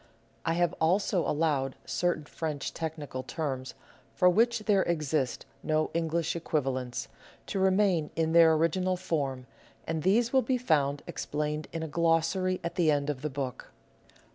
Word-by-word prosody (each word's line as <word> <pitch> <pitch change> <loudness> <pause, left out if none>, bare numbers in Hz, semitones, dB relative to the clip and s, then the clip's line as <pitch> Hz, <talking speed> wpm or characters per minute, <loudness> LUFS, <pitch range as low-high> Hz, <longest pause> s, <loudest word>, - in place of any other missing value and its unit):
I 165 - +3
have 175 0 +1
also 180 +2 +2
allowed 145 -4 0
certain 175 -4 -1
French 150 -2 -4
technical 155 -5 -5
terms, 135 -3 -4 0.4
for 180 - +4
which 235 +4 +3
there 200 -3 +4
exist 155 -6 -1 0.2
no 155 0 0
English 165 0 0
equivalents, 135 -6 -2 0.4
to 195 - -3
remain 190 -4 +3
in 160 -1 +1
their 165 -1 +7
original 180 +4 +1
form, 140 -8 -2 0.4
and 160 -1 -2
these 225 - +2
will 265 - +5
be 255 +2 0
found 145 - +1
explained 150 +1 -3
in 165 -1 -4
a - - -3
glossary 170 +3 +1
at 170 +2 -4
the 170 -3 +3
end 145 -1 +2
of 130 -3 -7
the 150 - -2
book. 135 -3 -5
160 Hz, 150 wpm, -29 LUFS, 150-180 Hz, 0.4 s, their